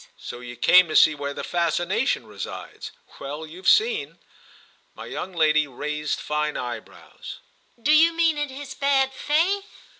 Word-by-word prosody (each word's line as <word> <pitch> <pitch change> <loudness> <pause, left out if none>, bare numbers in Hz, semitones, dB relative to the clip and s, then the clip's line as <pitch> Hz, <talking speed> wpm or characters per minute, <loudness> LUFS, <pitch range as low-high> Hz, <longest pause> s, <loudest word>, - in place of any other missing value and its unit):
"So 120 - -8
you 120 0 -9
came 180 +9 +6
to 155 - -5
see 155 - +6
where 140 -1 -5
the - - -5
fascination 175 - 0
resides? - - -8 0.3
Well, 145 +3 -6
you've 175 +5 -2
seen!" 440 -1 +2 0.8
My - - -9
young 190 - -6
lady 155 -3 +2
raised 150 +3 -4
fine 150 0 -2
eyebrows. 120 -1 -8 0.4
"Do 285 +6 +3
you 325 +2 +6
mean 330 -1 +2
in 295 -1 -2
his 270 +1 -8
bad 270 -1 +1
faith?" 345 +9 0
185 Hz, 150 wpm, -24 LUFS, -, 0.8 s, came